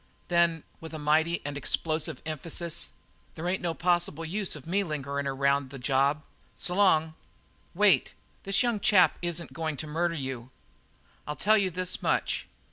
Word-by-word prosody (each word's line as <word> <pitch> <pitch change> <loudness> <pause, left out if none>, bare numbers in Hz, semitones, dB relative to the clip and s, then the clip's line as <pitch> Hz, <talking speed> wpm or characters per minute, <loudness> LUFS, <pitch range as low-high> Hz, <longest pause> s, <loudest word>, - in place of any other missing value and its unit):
"Then" 170 -2 +3 0.2
with 160 0 -8
a - - -3
mighty 155 +3 +2
and 145 -1 -3
explosive 155 +2 -2
emphasis 160 +2 -3 0.5
"there 165 +2 -4
ain't 185 +1 0
no 170 -2 -1
possible 175 -2 0
use 195 +3 -1
of 150 - -10
me 195 +5 +1
lingering 140 -4 -3
around 140 0 +1
the 135 - -8
job. 140 +3 +1 0.3
S' - - 0
long." 170 -5 +3 0.6
"Wait. 195 -8 +4 0.3
This 195 +5 +2
young 240 -3 +1
chap 195 -3 +4
isn't 175 -1 -3
going 160 -3 -3
to 155 - -4
murder 170 +3 -1
you. 130 -4 -5 0.8
I'll 150 - -3
tell 215 +6 +4
you 200 -3 +2
this 185 +1 -2
much. - - 0
160 Hz, 160 wpm, -28 LUFS, 145-180 Hz, 0.8 s, Wait